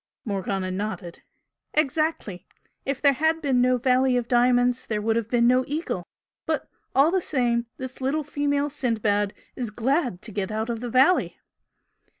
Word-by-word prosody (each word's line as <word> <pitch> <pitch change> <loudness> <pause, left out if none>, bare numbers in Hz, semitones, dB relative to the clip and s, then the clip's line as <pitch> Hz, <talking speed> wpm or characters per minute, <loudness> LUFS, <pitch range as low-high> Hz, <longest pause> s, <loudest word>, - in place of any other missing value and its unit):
Morgana 195 -2 -2
nodded. 185 -3 -5 0.5
"Exactly! 300 - 0 0.4
If 275 0 -2
there 280 -1 +6
had 315 +4 +1
been 270 -5 +2
no 250 0 +3
Valley 255 0 +3
of 240 -1 -2
Diamonds 245 +1 +3
there 215 -2 -1
would 225 +1 0
have 230 -1 -1
been 235 -1 +3
no 255 +1 +4
Eagle! 290 - -3 0.4
But, - - -1 0.3
all 280 +5 +5
the 375 0 +1
same, 240 -6 0
this 260 0 -7
little 285 +4 0
female 285 0 -1
Sindbad 215 -7 0 0.2
is 245 -3 -3
glad 245 - -1
to 220 - -6
get 200 0 -3
out 220 +2 -2
of 230 - -3
the 245 +1 -5
valley!" 265 +10 +3
245 Hz, 160 wpm, -25 LUFS, 220-275 Hz, 0.5 s, there